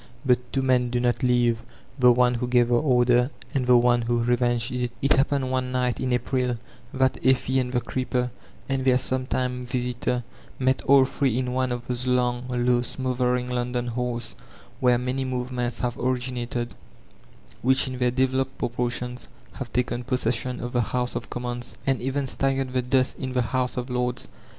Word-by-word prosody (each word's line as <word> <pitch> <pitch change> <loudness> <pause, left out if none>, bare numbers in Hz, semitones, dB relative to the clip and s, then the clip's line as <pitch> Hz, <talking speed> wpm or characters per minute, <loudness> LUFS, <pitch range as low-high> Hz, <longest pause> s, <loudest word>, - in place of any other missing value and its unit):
But 125 -2 +4
two 135 - 0
men 125 -2 +2
do 120 0 0
not 120 0 +1
live, 120 -2 +2 0.2
— 130 - -16
^the 125 -1 +8
one 125 0 +4
who 120 +1 -2
gave 120 -1 +3
the - - +2
order, 125 -3 +3 0.2
and 130 -3 0
the 125 -1 +7
one 120 0 +4
who 120 0 0
revenged 120 0 +1
it 125 -1 -2
It 140 - 0
hai^ned 135 -1 +3
one 130 -1 -1
night, 125 -1 0
in 130 - -1
April, 125 0 0 0.3
that 130 0 0
Effie 130 0 +3
and 125 -1 -2
the 125 -1 +1
creeper 125 -1 -2 0.4
and 135 -1 -1
their 130 -1 +4
sometime 130 -1 -1
visitor 125 0 -2 0.3
met 130 0 +1
all 135 -1 +7
three 130 -2 0
in 125 -1 -1
one 130 0 0
of 120 -1 -4
those 125 0 -3
long 125 0 +1
low 120 0 +2
smothering 125 0 -1
London 125 0 -1
halls 120 -1 -3 0.4
where 125 -1 +4
many 125 +2 -2
movements 125 -2 -2
have 120 -1 -2
originated, 125 -1 -2 0.9
which 130 +2 +3
in 130 -1 -5
their 125 -1 +3
devel 130 +1 +1
oped 135 0 -3
proportions 125 +1 -2 0.3
have 130 -3 -7
taken 125 0 -1
possession 125 0 -1
of 120 0 -5
the 120 - +3
House 125 +2 -1
of - - -4
Commons, 120 0 -3
and 135 -1 +1
even 135 +2 -1
stirred 135 0 0
the 130 - +2
dust 130 +1 +1
in 130 -1 -4
the 125 -1 +2
House 130 -1 0
of 125 0 -2
Lords. 125 0 -1
125 Hz, 185 wpm, -25 LUFS, 120-130 Hz, 0.9 s, ^the